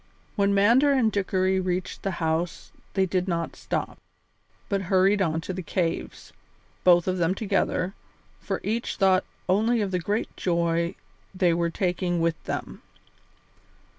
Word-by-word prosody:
When 200 -2 +2
Mander 235 +8 +5
and 250 -5 +3
Dickory 190 -1 +1
reached 185 0 -2
the 195 - -1
house 165 +1 -2 0.2
they 190 -1 +3
did 185 0 -1
not 170 -2 -2
stop, - - -4 0.7
but 200 -2 0
hurried 195 +2 +4
on 160 -3 0
towards 185 +2 -5
the - - -2
cave, 170 -1 -3 0.5
both 175 -1 +5
of 185 0 0
them 175 +2 +2
together, 195 -2 0 0.5
for - - -3
each 230 +3 -2
thought 190 -1 +3 0.2
only 220 +5 +2
of 200 -3 -1
the 180 - 0
great 205 +6 -2
joy 170 0 0 0.4
they 180 -2 +3
were 170 0 +1
taking 175 0 -1
with 165 -1 0
them. - - -5
185 Hz, 145 wpm, -26 LUFS, 170-200 Hz, 0.7 s, Mander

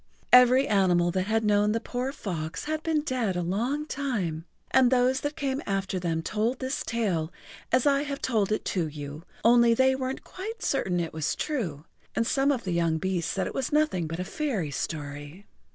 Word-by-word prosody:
Every 250 +2 +7
animal 180 -4 +3
that 185 +1 -1
had 225 +1 +1
known 210 0 +3
the 225 - 0
poor 250 +3 -3
fox 170 - -5
had 310 0 -2
been 320 -2 +1
dead 245 -9 -1
a 175 - -1
long 240 - -1
time, 205 - -2 0.3
and 260 -2 +5
those 255 +1 +2
that 290 +1 -3
came 275 0 -2
after 195 -1 -1
them 165 -2 -1
told 220 +8 0
this 260 +1 -3
tale 190 -9 -1 0.4
as 255 0 +3
I 280 -1 +4
have 285 -1 -4
told 215 -5 0
it 215 - -1
to 175 -4 0
you, 145 0 -7 0.2
only 235 0 +6
they 260 +2 +4
weren't 260 0 -3
quite 440 +5 -7
certain 185 -10 0
it 165 -1 -3
was 155 -2 -1
true, 175 - -3 0.3
and 230 - +1
some 275 +3 +2
of 255 -4 -1
the 185 - -3
young 170 -2 +1
beasts 180 0 -1
said 190 - -1
it - - -5
was 265 - -2
nothing 295 - +1
but 165 +2 -5
a - - -1
fairy 215 - -2
story. 145 +5 -5
220 Hz, 200 wpm, -27 LUFS, 175-265 Hz, 0.4 s, Every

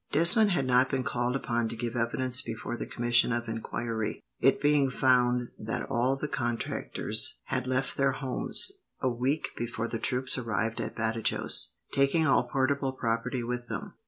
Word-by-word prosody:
Desmond 205 +6 +7
had 155 -8 0
not 125 0 +3
been 130 -1 -1
called 125 -1 -1
upon 120 -3 -1
to 115 - -4
give 120 +1 -4
evidence 125 +2 +2
before 115 -2 -5
the - - -6
commission 120 0 +3
of 115 0 -2
enquiry, 115 0 -4 0.2
it - - +3
being 145 -2 +3
found 125 -1 +2
that 110 +1 -4
all 125 +3 +1
the 145 +2 -4
contractors 120 -4 0
had 130 -1 -3
left 130 +1 -1
their 135 -1 +2
homes, 135 - 0 0.3
a 130 - +1
week 130 +5 -1
before 115 -1 -4
the 115 -1 -4
troops 125 +2 0
arrived 115 -1 -2
at - - -5
Badajos, 110 0 0 0.2
taking 140 +4 +2
all - - +3
portable 135 0 0
property 120 +1 -2
with 120 +1 -4
them. - - -6
125 Hz, 165 wpm, -28 LUFS, 115-135 Hz, 0.3 s, Desmond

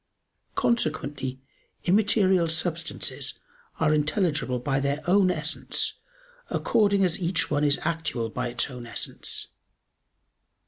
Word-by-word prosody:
Consequently 145 - 0 0.4
immaterial 190 -2 +4
substances 165 +1 -2 0.4
are 155 -1 +3
intelligible 150 -3 +1
by 135 +2 0
their 140 +2 -1
own 185 +1 +4
essence 155 -2 -1 0.5
according 200 -3 +3
as 175 -1 -1
each 175 +2 0
one 145 0 +2
is 145 -1 +3
actual 160 -8 -1
by 125 +3 -3
its 120 +3 -1
own 125 -2 -8
essence. - - -4
155 Hz, 105 wpm, -26 LUFS, 140-180 Hz, 0.5 s, immaterial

